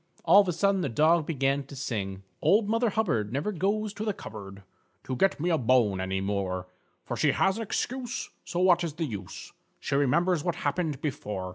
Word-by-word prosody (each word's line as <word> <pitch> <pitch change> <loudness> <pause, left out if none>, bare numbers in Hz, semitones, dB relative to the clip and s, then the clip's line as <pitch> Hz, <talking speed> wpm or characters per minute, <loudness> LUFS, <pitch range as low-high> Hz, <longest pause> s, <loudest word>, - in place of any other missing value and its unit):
All 205 - +8
of 200 - -2
a - - +2
sudden, 195 +3 +1
the 140 - -1
Dog 155 +6 +3
began 140 -2 0
to 140 - -11
sing: 100 -8 -4 0.2
"_Old 205 +8 +4
Mother 230 +3 +1
Hubbard 150 - 0
never 145 - -1
goes 205 +3 -1
to 215 - -5
the 210 -3 -1
cupboard 100 -2 -9 0.4
To 130 - -3
get 195 +6 +2
me 175 +4 0
a 160 - +2
bone 115 -6 +3
any 95 0 -2
more; 95 -2 -2 0.4
For - - -3
she - - +2
has 195 +1 +2
an - - -3
excuse, 245 +3 -3
so 175 +1 -3
what 180 -1 +4
is 165 -3 -3
the 165 +1 -2
use? 105 -9 -7 0.3
She - - -4
remembers 155 +5 +2
what 175 - -1
happened 145 -1 -2
before. 105 -10 -4
155 Hz, 205 wpm, -28 LUFS, -, 0.4 s, All